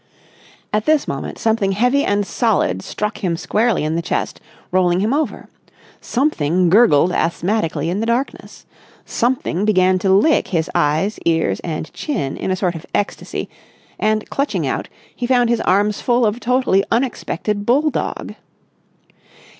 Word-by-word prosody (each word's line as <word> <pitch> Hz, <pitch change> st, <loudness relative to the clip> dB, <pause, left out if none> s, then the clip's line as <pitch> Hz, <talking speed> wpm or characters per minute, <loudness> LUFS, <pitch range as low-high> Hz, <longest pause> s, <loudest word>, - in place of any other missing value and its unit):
At 215 Hz, 0 st, +1 dB
this 310 Hz, -2 st, +3 dB
moment 135 Hz, -, -4 dB
something 220 Hz, -3 st, +1 dB
heavy 250 Hz, +7 st, +2 dB
and 205 Hz, 0 st, +1 dB
solid 200 Hz, -, 0 dB
struck 210 Hz, -, -4 dB
him 170 Hz, -3 st, 0 dB
squarely 225 Hz, +4 st, +1 dB
in 155 Hz, +1 st, -1 dB
the 170 Hz, -, 0 dB
chest, -, -, -3 dB, 0.3 s
rolling 180 Hz, -1 st, +2 dB
him 215 Hz, +6 st, +1 dB
over. 285 Hz, -7 st, -2 dB, 0.5 s
Something 180 Hz, -, +1 dB
gurgled 180 Hz, -6 st, +5 dB
asthmatically 170 Hz, 0 st, -1 dB
in 180 Hz, +4 st, -1 dB
the 225 Hz, -, -2 dB
darkness. 240 Hz, +4 st, -3 dB, 0.4 s
Something 235 Hz, -6 st, -1 dB
began 185 Hz, -3 st, +3 dB
to 190 Hz, -, 0 dB
lick 220 Hz, +11 st, +4 dB
his 165 Hz, -6 st, -1 dB
eyes, 155 Hz, +8 st, +1 dB
ears, 160 Hz, -13 st, +1 dB
and 160 Hz, -2 st, -5 dB
chin 200 Hz, -, -3 dB
in -, -, -4 dB
a 185 Hz, -, +1 dB
sort 185 Hz, -2 st, -1 dB
of 165 Hz, -1 st, -8 dB
ecstasy; 205 Hz, -, -3 dB, 0.5 s
and, 215 Hz, 0 st, 0 dB
clutching 280 Hz, +1 st, -1 dB
out, -, -, -3 dB, 0.3 s
he 245 Hz, -, -3 dB
found 245 Hz, -2 st, +3 dB
his 235 Hz, -, +1 dB
arms 205 Hz, +2 st, +1 dB
full 240 Hz, -1 st, +2 dB
of 215 Hz, +2 st, 0 dB
totally 250 Hz, -6 st, +2 dB
unexpected 225 Hz, -4 st, -1 dB
bulldog. 290 Hz, +5 st, 0 dB
205 Hz, 145 wpm, -19 LUFS, 175-240 Hz, 0.5 s, gurgled